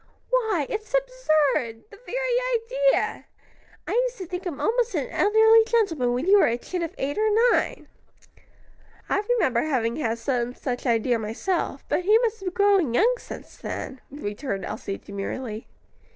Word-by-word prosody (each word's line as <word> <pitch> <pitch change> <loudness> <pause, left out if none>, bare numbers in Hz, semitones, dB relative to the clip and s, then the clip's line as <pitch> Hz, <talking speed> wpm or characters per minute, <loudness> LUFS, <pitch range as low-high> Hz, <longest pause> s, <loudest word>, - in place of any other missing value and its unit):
Why, 440 - +1
it's 435 +3 -4
absurd! 310 - +1
the 410 - -14
very - - +1
idea! - - -3 0.6
I - - -3
used - - 0
to 380 - -6
think 360 +2 -5
him 305 -6 -5
almost 480 +1 +1
an - - -2
elderly 445 +1 +5
gentleman 330 - +1
when 250 +5 -1
you 400 +2 +6
were - - +5
a 235 - 0
chit 360 +8 -5
of 330 - -4
eight 285 +7 -2
or 435 0 +3 0.2
nine." - - -1 1.2
"I - - +2 0.2
remember 255 - +2
having 240 -6 0
had 230 -6 -1
some 245 +1 -2
such 250 0 -4
idea 235 0 +2
myself; 225 - -2
but - - +1
he 420 +4 +5
must 455 -2 0
have 390 - -10
been 400 +3 +1
growing 370 - +3
young 470 - +4
since - - -10
then," 265 -1 -6
returned 205 -6 -4
Elsie, 200 -2 -5
demurely. 215 +3 -6
350 Hz, 165 wpm, -25 LUFS, -, 1.2 s, you